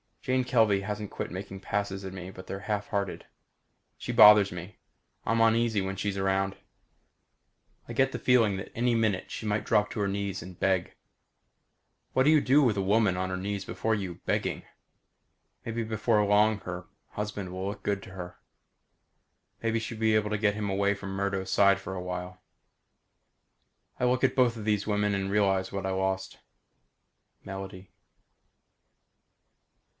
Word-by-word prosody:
Jane 130 0 +1
Kelvey 110 -5 +3
hasn't 105 0 -4
quit - - -5
making 95 +1 -7
passes 100 0 -3
at 95 - -6
me 95 -1 -7
but 95 -1 -11
they're 95 +1 -6
half 105 0 -2
hearted. 100 -2 -3 0.7
She - - -5
bothers 105 -1 +8
me. 90 +2 -8 0.5
I'm 115 +1 +2
uneasy 115 -2 +3
when 95 0 -3
she's 100 +1 -2
around. 95 0 0 1.3
I - - -6
get 135 0 +2
the - - -4
feeling 115 -6 +3
that 95 - -7
any 120 +1 +2
minute 110 -4 0
she - - -6
might 105 0 0
drop 105 -1 +2
to - - -5
her 100 - +1
knees 100 0 -3
and 90 -2 -11
beg. 95 -2 0 1.2
What 130 - +4
do 145 - +4
you 155 -2 +5
do 140 +3 +4
with 115 -6 +2
a - - +1
woman 100 -1 +3
on 95 0 -1
her 95 - -2
knees 100 +1 -3
before 110 0 -1
you, 95 -4 -4
begging? - - -1 1.0
Maybe 115 0 -2
before 110 0 +1
long 105 +1 +3
her 90 -1 -6 0.2
husband 105 -3 -5
will 95 +1 -4
look 100 0 -5
good 100 -1 -1
to - - -11
her. 90 -2 -8 1.2
Maybe 115 0 0
she'll 110 0 -6
be 110 -1 +3
able 105 -1 +1
to 105 - +1
get 105 -1 +1
him 105 -1 -2
away 100 +1 +2
from 100 -1 -7
Murdo's 100 -1 -2
side 100 -1 +5
for 95 -1 -6
a 90 - -4
while. 90 0 -6 1.6
I 125 - +1
look 125 +1 +1
at - - +3
both 125 -3 +4
these 105 -2 -1
women 105 -1 +1
and 95 0 -2
realize 95 -2 +2
what 100 -1 -4
I 95 - -1
lost. 95 0 -2 1.0
Melody. 95 -1 -8
100 Hz, 170 wpm, -28 LUFS, 95-110 Hz, 1.6 s, bothers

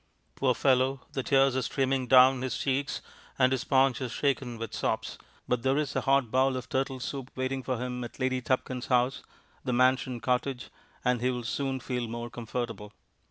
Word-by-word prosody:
Poor 130 -2 +1
fellow, 130 0 +2
the 135 - -2
tears 135 0 +3
are 130 - +1
streaming 130 +1 0
down 130 +1 +7
his 130 -2 -2
cheeks, 140 +1 -1 0.4
and 130 -1 +4
his 130 - 0
paunch 135 -2 +3
is 125 -3 -3
shaken 135 -4 -1
with 115 -1 -6
sobs, - - -2 0.3
but 125 -1 0
there 135 +2 +2
is 145 -2 -1
a - - +1
hot 135 -4 +2
bowl 130 0 +3
of 125 0 -6
turtle 135 0 -1
soup 130 +1 -5
waiting 130 +1 -2
for 130 -1 -2
him 125 0 -4
at 120 - -9
Lady 130 0 0
Tupkins' 130 0 -1
house, 125 +1 +2 0.4
The 125 - -1
Mansion 130 0 +2
Cottage, 125 +3 -1 0.3
and 125 -1 +2
he 125 - +2
will 125 -1 -3
soon 135 +3 -2
feel 125 -1 -3
more 120 +1 -5
comfortable. 115 -3 -5
130 Hz, 190 wpm, -29 LUFS, 125-135 Hz, 0.4 s, down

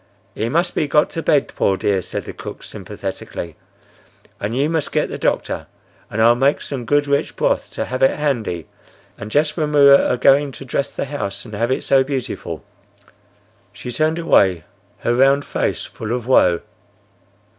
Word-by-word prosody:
"He 110 +2 -2
must 170 +6 +1
be 150 - 0
got 150 +1 +2
to 165 - -3
bed, 145 -3 +2
poor 95 - 0
dear!" 95 -1 +1
said - - -5
the - - -7
cook, - - -9
sympathetically. 85 -2 -7 0.8
"And 110 +4 -3
you 140 +2 +2
must 160 -2 -1
get - - 0
the - - -6
doctor, - - -1 0.4
and 110 - -4
I'll 115 +1 +6
make 135 +4 +2
some 130 -4 -5
good 145 +3 +2
rich 140 0 0
broth - - 0
to - - -2
have 130 - -4
it 135 - +4
handy.—And 110 - -5
just 150 +5 +1
when 150 -2 -1
we 145 - +5
were 140 0 +8
a - - +1
goin' 140 +3 +4
to 135 - -9
dress 140 +2 -2
the - - -2
house 115 -9 -4
and 110 - -11
have 115 +3 -1
it 130 - -1
so 135 -1 +4
beautiful!" 135 -2 -4 1.1
She 125 - -7
turned 155 +5 0
away, 95 - +3 0.4
her 120 - +1
round 135 +3 +4
face - - -2
full 110 +1 -5
of 125 -2 -3
woe. 90 -9 +4
135 Hz, 180 wpm, -20 LUFS, 115-145 Hz, 1.1 s, were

